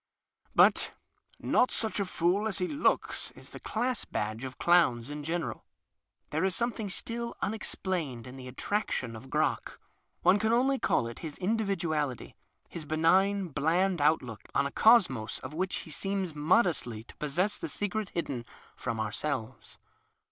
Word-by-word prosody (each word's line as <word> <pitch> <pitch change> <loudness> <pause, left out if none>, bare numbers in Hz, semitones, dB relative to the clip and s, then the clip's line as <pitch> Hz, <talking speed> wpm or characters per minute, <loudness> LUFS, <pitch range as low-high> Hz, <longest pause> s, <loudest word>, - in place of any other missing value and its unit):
But - - +5 0.2
" - - -34
not 250 - +3
such 220 -2 -1
a 200 - +1
fool 185 +4 +1
as 210 - -1
he 180 -2 0
looks 290 - 0
" - - -26
is - - -14
the - - -8
class 250 -2 -1
badge 110 +3 -3
of 130 -1 -6
clowns 145 -8 +3
in 150 0 -5
general. 165 +2 -3 0.7
There 155 +3 0
is 190 -1 +2
something 235 -3 -1
still 235 +4 -3
unexplained 180 - -2
in 125 +1 -9
the 130 -1 -8
attrac 205 +11 -1
tion 115 -3 -2
of 125 +4 -10
Crock. - - 0 0.4
One 185 +4 +5
can 220 +1 +1
only 265 +3 +3
call - - +2
it 115 0 -7
his 155 -3 -6
individuality 175 - -1 0.2
— - - -37
his 165 - -6
benign, 185 +5 +3
bland 170 +4 +1
outlook 130 -7 +1
on 140 - +3
a 140 - -2
cosmos 175 - +4
of 130 +3 -7
which 185 +4 -1
he 160 - -10
seems 195 +2 -1
modestly 150 - +2
to - - -15
possess 175 +8 0
the - - -4
secret 205 0 -2
hidden 140 -8 -3 0.3
from 115 -3 -3
our 110 -1 -1
selves. 120 -4 -4
170 Hz, 170 wpm, -30 LUFS, 135-200 Hz, 0.7 s, But